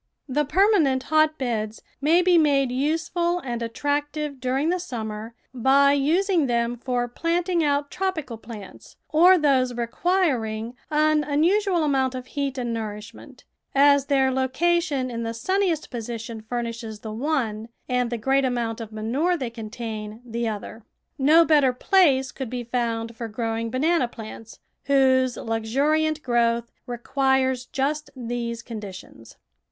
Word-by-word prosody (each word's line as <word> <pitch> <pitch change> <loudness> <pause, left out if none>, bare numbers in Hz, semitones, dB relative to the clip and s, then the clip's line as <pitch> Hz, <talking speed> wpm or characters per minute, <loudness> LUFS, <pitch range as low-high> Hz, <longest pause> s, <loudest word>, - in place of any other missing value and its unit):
The 295 +2 0
permanent 310 -6 +3
hotbeds 260 -9 0 0.2
may 330 +5 +4
be 360 0 +4
made 275 -4 +3
useful 325 +6 0
and 240 -8 -4
attractive 290 +4 -2
during 265 +5 0
the 360 +1 +1
summer 225 -7 -6 0.2
by 275 +3 +4
using 325 +3 +2
them 235 0 0
for 245 0 -2
planting 340 +6 0
out 285 -1 0
tropical 315 -12 -3
plants 215 -4 -11
or 355 +4 +6
those 260 -5 +2
requiring 235 -4 0 0.2
an 305 0 +3
unusual 345 +5 +2
amount 265 -3 +1
of 255 -1 -6
heat 280 0 -3
and 240 -2 -2
nourishmxcnt, 215 -1 -8 0.3
as 280 0 +5
their 270 -2 +3
location 265 +1 0
in 230 -1 -4
the 230 0 -3
sunniest 370 - 0
position 230 -1 -6
furnishes 230 -1 -5
the 215 -1 -6
one 230 -4 -2 0.2
and 250 -1 0
the 240 - -2
great 270 +5 +2
amount 240 -3 -1
of 225 -1 -7
manure 255 +12 0
they 255 -6 -4
contain 220 -1 -6
the 235 0 -3
other. 220 +1 -6 0.4
No 315 +5 +6
better 290 -5 +4
place 270 -3 +3
could 265 -4 -6
be 245 0 -4
found 230 -1 -2
for 230 0 -5
growing 225 +1 -3
banana 270 +3 +1
plants, 225 -1 -10 0.2
whose 260 -2 +3
luxuriant 290 +8 0
growth 235 -1 +1 0.2
requires 260 +1 0
just 300 +3 -2
these 235 -1 -4
conditions. 200 - -10
260 Hz, 135 wpm, -24 LUFS, 230-300 Hz, 0.4 s, or